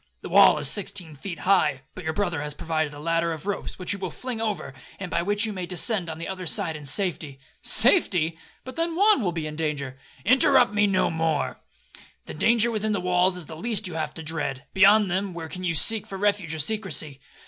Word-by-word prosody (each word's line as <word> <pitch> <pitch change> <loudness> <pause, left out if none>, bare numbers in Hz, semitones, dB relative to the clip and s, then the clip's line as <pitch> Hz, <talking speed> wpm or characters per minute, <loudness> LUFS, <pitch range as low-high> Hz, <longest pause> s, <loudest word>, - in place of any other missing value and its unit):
The - - -8
wall - - +6
is - - 0
sixteen 185 -5 -1
feet 170 +5 -7
high,—but 150 -9 0
your 160 - -1
brother 175 -4 -2
has 150 0 -5
provided 155 -1 -2
a 145 - -11
ladder 165 +2 0
of 160 +1 -9
ropes, 205 -1 -4
which 180 - -3
he 205 - -2
will 185 -2 -4
fling 245 +5 -6
over, 210 -11 -3 0.3
and 185 -3 -6
by 170 - 0
which 205 +4 +3
you 215 - -4
may 185 -2 -5
descend 185 0 0
on 160 - -6
the 170 - -6
other 185 -2 -6
side 160 +3 0
in 150 -1 -9
safety.'—'Safety! 165 - +2 0.3
but 260 - -9
then 330 0 0
Juan 410 -3 +4
will 185 -5 0
be 165 -2 -4
in 155 0 -6
danger.'—'Interrupt 160 - +1
me 205 0 +3
no 190 -2 +1
more,—the 160 -2 -5
danger 230 +7 +3
within 215 -1 -1
the 205 - -1
walls 180 0 +1
is 175 - -5
the 160 - -9
least 215 +3 -1
you 180 - -7
have 155 -2 -4
to 160 - -7
dread, 150 -4 -3
beyond 205 +2 +5
them, 190 0 -2
where 165 -1 -6
can 180 +3 -8
you 170 -2 -1
seek 220 +6 +2
for 195 - -7
refuge 200 -5 0
or - - -5
secrecy? 155 -5 -1
180 Hz, 215 wpm, -25 LUFS, 160-205 Hz, 0.3 s, wall